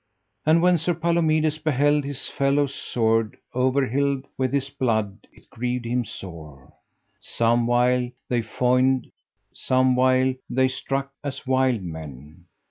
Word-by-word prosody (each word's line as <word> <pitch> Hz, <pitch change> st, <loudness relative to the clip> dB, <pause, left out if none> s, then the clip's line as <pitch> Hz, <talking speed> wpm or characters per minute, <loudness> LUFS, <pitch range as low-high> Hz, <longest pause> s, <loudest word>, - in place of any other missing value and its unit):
And 165 Hz, +2 st, +4 dB
when 180 Hz, -1 st, +4 dB
Sir 170 Hz, +2 st, 0 dB
Palomides 160 Hz, -2 st, +1 dB
beheld 145 Hz, -1 st, +2 dB
his 140 Hz, -2 st, -4 dB
fellow's 140 Hz, 0 st, +1 dB
sword 115 Hz, -2 st, 0 dB, 0.2 s
over 130 Hz, +2 st, +2 dB
hylled 140 Hz, +1 st, 0 dB
with 130 Hz, -1 st, -1 dB
his 140 Hz, -1 st, 0 dB
blood 110 Hz, -6 st, -2 dB
it -, -, -22 dB
grieved 125 Hz, +1 st, -3 dB
him 120 Hz, +1 st, -1 dB
sore: 80 Hz, -9 st, -10 dB, 0.5 s
some 115 Hz, 0 st, +1 dB
while 125 Hz, 0 st, +2 dB, 0.2 s
they 120 Hz, -2 st, 0 dB
foined, 125 Hz, +3 st, +1 dB, 0.4 s
some 130 Hz, 0 st, +2 dB
while 130 Hz, +1 st, +3 dB, 0.2 s
they 130 Hz, +1 st, +2 dB
struck 135 Hz, +1 st, -3 dB
as 140 Hz, -1 st, -5 dB
wild 130 Hz, -4 st, +1 dB
men. 80 Hz, 0 st, -9 dB
130 Hz, 130 wpm, -24 LUFS, 115-140 Hz, 0.5 s, And